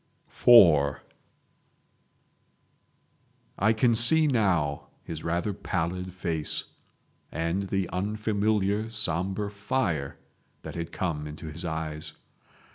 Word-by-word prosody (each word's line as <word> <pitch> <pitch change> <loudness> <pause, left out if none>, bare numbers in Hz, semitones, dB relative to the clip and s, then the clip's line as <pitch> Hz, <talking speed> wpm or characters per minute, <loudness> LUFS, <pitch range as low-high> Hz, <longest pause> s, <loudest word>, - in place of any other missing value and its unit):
IV 80 - +7 2.6
I 110 +4 +3
can 115 +2 +2
see 155 +8 +6
now 95 - 0 0.2
his 80 -2 -7
rather 85 +5 -1
pallid 90 +1 -3
face, 85 -4 -2 0.7
and 85 +5 -2
the 95 -2 -1
unfamiliar 105 +1 -1
sombre 100 -1 0
fire 100 - -2 0.5
that - - -7
had 85 -1 -5
come 75 -5 -3
into 75 +1 -8
his 80 +3 -7
eyes. 80 -1 -5
95 Hz, 95 wpm, -27 LUFS, 80-105 Hz, 2.6 s, IV